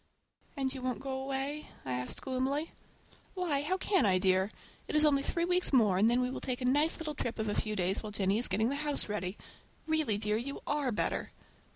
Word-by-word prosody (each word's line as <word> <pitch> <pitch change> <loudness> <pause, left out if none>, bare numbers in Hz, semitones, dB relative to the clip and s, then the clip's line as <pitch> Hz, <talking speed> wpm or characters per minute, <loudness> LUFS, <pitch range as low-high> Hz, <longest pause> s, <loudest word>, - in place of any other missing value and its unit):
"And 265 -1 -1
you 265 - -7
won't 255 -2 -2
go 265 0 -4
away?" 275 +3 -3 0.2
I 130 - -2
asked 125 0 -3
gloomily. 270 +4 -1 0.6
"Why, 335 -7 0
how 365 +6 0
can 385 0 +2
I, 190 -3 +4
dear? 190 +2 +2 0.4
It - - -4
is 305 0 +6
only 280 -2 +4
three 335 +4 -1
weeks 360 +1 +3
more 215 -8 +4
and 215 +3 +5
then 245 +1 +3
we 250 0 -1
will - - -5
take 250 -2 -2
a 250 - -3
nice 290 +5 +3
little 310 -2 -4
trip 240 -4 -3
of 220 -1 -2
a 205 - 0
few 215 0 -1
days 190 0 0
while 215 - -6
Jennie 200 +1 +1
is 245 - +5
getting 215 +5 +1
the 280 - -2
house 295 -1 -1
ready. 205 -2 -3 0.5
Really, 315 -9 +1
dear, 210 0 0
you 275 +5 -5
are 285 -3 0
better!" 210 - -2
255 Hz, 225 wpm, -32 LUFS, 210-290 Hz, 0.6 s, is